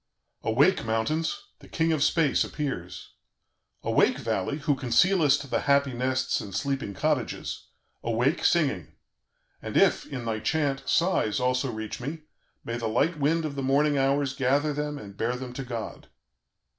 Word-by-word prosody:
"Awake, 140 +12 +3
mountains! 125 +9 -1
The - - -15
king 165 0 0
of 155 - -1
space 155 0 +3
appears! 90 - -5 0.7
"Awake, - - +3
valley! 120 +10 -2
who 150 0 +1
concealest 140 +4 +3
the - - 0
happy 140 -1 +3
nests 130 +1 0
and 100 -2 -8
sleeping 135 -4 -2
cottages; 150 -3 -2 0.3
awake, 120 +8 0
singing. 135 - +1 0.7
And - - -3
if, - - +3
in 125 -4 -6
thy 110 -1 -1
chant, 135 +4 0
sighs 170 - +2
also 125 +1 0
reach 110 +1 -6
me, 155 +5 -5 0.4
may 115 0 -3
the 115 -1 -2
light 145 +9 +1
wind 160 +3 +1
of 150 - -3
the 140 - -4
morning 145 +3 +2
hours 135 0 +1
gather 140 +2 +1
them 150 0 -3
and 100 -7 -10
bear 115 +4 -1
them 125 -1 -7
to 135 - -5
God. 120 -3 -6
135 Hz, 155 wpm, -27 LUFS, 115-150 Hz, 0.7 s, Awake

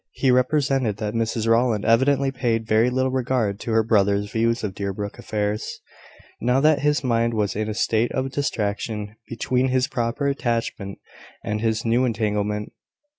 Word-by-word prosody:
He 130 - +2
represented 130 -3 +1
that 105 0 -3
Mrs 115 -1 -1
Rowland 115 -2 +2
evidently 135 +4 +3
paid 120 -4 -1
very 110 +2 +3
little 130 +1 0
regard 125 -6 0
to 115 - -4
her 110 0 +4
brother's 100 -2 +2
views 115 +1 0
of 100 -3 -2
Deerbrook 100 +1 -4
affairs, 105 0 -3 0.6
now 125 +2 +2
that 150 +1 +4
his 150 +1 +1
mind 115 -2 +1
was 105 -3 0
in 110 +1 -2
a 105 - -3
state 115 +2 +1
of 130 0 -2
distraction 105 -5 -2
between 125 +3 0
his 130 0 +1
proper 125 0 -2
attachment 115 -7 -2 0.5
and 105 0 -2
his 110 0 0
new 115 +3 +2
entanglement. 105 -3 -1
115 Hz, 160 wpm, -23 LUFS, 105-130 Hz, 0.6 s, her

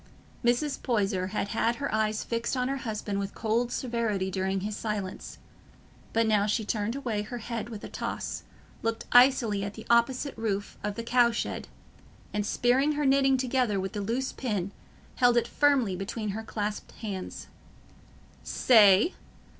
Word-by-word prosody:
Mrs. 245 +4 +1
Poyser 195 -6 0
had 200 0 -2
had 230 +1 +1
her 280 -2 -3
eyes 215 0 +1
fixed 235 +2 -2
on 250 +1 0
her 275 - -1
husband 210 -5 -3
with 200 0 -4
cold 235 +2 0
severity 225 -6 -1
during 190 0 -1
his 210 +2 -3
silence, 210 -4 -4 0.7
but 230 0 +2
now 210 -2 +3
she 215 +1 0
turned 215 +2 -1
away 235 -7 -2
her 215 +4 -6
head 230 -1 -5
with 215 -3 -8
a - - -5
toss, - - -4 0.4
looked 230 0 -2
icily 245 -5 +5
at 200 0 -5
the 220 - -9
opposite 255 +4 +2
roof 205 -3 -2
of 205 0 -3
the 230 - -4
cow 240 0 +4
shed, 230 - -3 0.7
and 210 0 -1
spearing 260 +7 +2
her 295 0 -1
knitting 270 0 +4
together 250 -5 +1
with 190 0 -4
the 205 - -3
loose 240 +6 -1
pin, 205 -7 -2 0.5
held 245 -1 +4
it 235 0 +2
firmly 275 -10 +2
between 205 +3 -4
her 210 +3 -3
clasped 210 -1 -4
hands. 195 -4 -6 1.0
"Say? 215 - +5
225 Hz, 160 wpm, -28 LUFS, 205-245 Hz, 1.0 s, icily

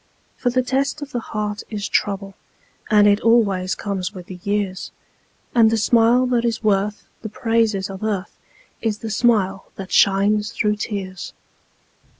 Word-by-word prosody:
For 245 - -1
the 255 +1 +1
test 275 +3 -1
of 290 - -9
the 245 - -2
heart 210 -2 -4
is 210 -2 -4
trouble, 195 -1 -1 0.6
And 210 -2 +5
it 205 +1 +3
always 205 -5 +2
comes 200 -1 -4
with 180 -1 -9
the 180 0 -10
years, 200 -1 -2 0.6
And 230 -2 +5
the 225 - +1
smile 235 +3 +4
that 245 -2 +1
is 235 -1 -1
worth 205 0 0
the 220 - -6
praises 225 -3 0
of 195 +1 -8
earth 200 -4 -3 0.5
Is 220 -2 -1
the 220 - -3
smile 210 -4 +1
that 190 -1 -8
shines 205 +2 +3
through 210 -1 0
tears. 190 -4 -5
210 Hz, 155 wpm, -21 LUFS, 195-230 Hz, 0.6 s, And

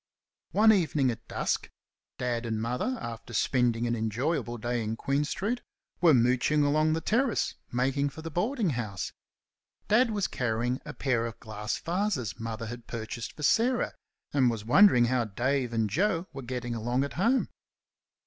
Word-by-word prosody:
One 220 +2 +6
evening 155 - +2
at 115 -1 -9
dusk - - -1 0.5
Dad 120 -1 -2
and 110 -1 -1
Mother, 125 - -1
after 115 0 -7
spending 120 -1 +2
an 120 0 0
enjoyable 120 +3 -1
day 120 +1 -1
in 110 +1 -2
Queen 140 +5 0
street, 215 +10 -2 0.4
were 165 -5 +7
mooching 125 +5 +3
along 155 +2 +3
the 160 - -1
Terrace 235 +6 +1 0.2
making 135 +3 +1
for 160 +3 -10
the 165 - -5
boardinghouse. 160 - -1 0.8
Dad 230 +3 +5
was 210 -3 0
carrying 120 0 -1
a 150 - -6
pair 120 -4 0
of 115 0 -9
glass 110 -1 -4
vases 170 - -2
Mother 115 0 -4
had 120 +1 -8
purchased 115 0 -5
for 150 - -9
Sarah, 240 - +2 0.4
and 130 -4 +4
was 110 -3 -4
wondering 125 - +6
how 120 0 +1
Dave 125 +4 -1
and 115 -2 +1
Joe 170 - +1
were 135 - -6
getting 120 -1 -4
along 120 +3 0
at 140 - -4
home. 235 +9 +2
125 Hz, 160 wpm, -29 LUFS, 115-165 Hz, 0.8 s, were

